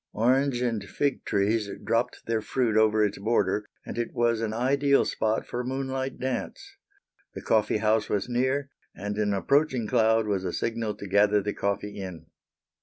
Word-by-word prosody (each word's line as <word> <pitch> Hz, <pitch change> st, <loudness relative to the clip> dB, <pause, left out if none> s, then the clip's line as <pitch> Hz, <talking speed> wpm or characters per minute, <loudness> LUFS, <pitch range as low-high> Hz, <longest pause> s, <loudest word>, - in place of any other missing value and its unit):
Orange 125 Hz, +3 st, +2 dB
and 115 Hz, -4 st, -1 dB
fig 140 Hz, +7 st, -1 dB
trees 105 Hz, +1 st, +1 dB
dropped 120 Hz, +2 st, -1 dB
their 115 Hz, -1 st, 0 dB
fruit 115 Hz, 0 st, 0 dB
over 110 Hz, -1 st, +4 dB
its 100 Hz, -1 st, -3 dB
border 105 Hz, -1 st, 0 dB, 0.2 s
and -, -, -5 dB
it 120 Hz, -, -3 dB
was 115 Hz, -2 st, +2 dB
an 110 Hz, -1 st, -1 dB
ideal 140 Hz, +4 st, +2 dB
spot 110 Hz, 0 st, -1 dB
for 120 Hz, -, -5 dB
a -, -, -1 dB
moonlight 130 Hz, +1 st, -3 dB
dance. 130 Hz, 0 st, -4 dB, 0.6 s
The -, -, -6 dB
coffee 110 Hz, -1 st, +2 dB
house 110 Hz, 0 st, +1 dB
was 100 Hz, -, 0 dB
near, 130 Hz, +3 st, 0 dB, 0.3 s
and 105 Hz, +2 st, -4 dB
an 105 Hz, -1 st, +1 dB
approaching 130 Hz, +4 st, +1 dB
cloud 110 Hz, -1 st, +3 dB
was 100 Hz, -3 st, -1 dB
a 90 Hz, -, -3 dB
signal 115 Hz, -2 st, -2 dB
to 100 Hz, -, -8 dB
gather 105 Hz, +2 st, +4 dB
the 105 Hz, +1 st, -3 dB
coffee 100 Hz, +1 st, -2 dB
in. 90 Hz, -4 st, -7 dB
110 Hz, 175 wpm, -27 LUFS, 105-125 Hz, 0.6 s, over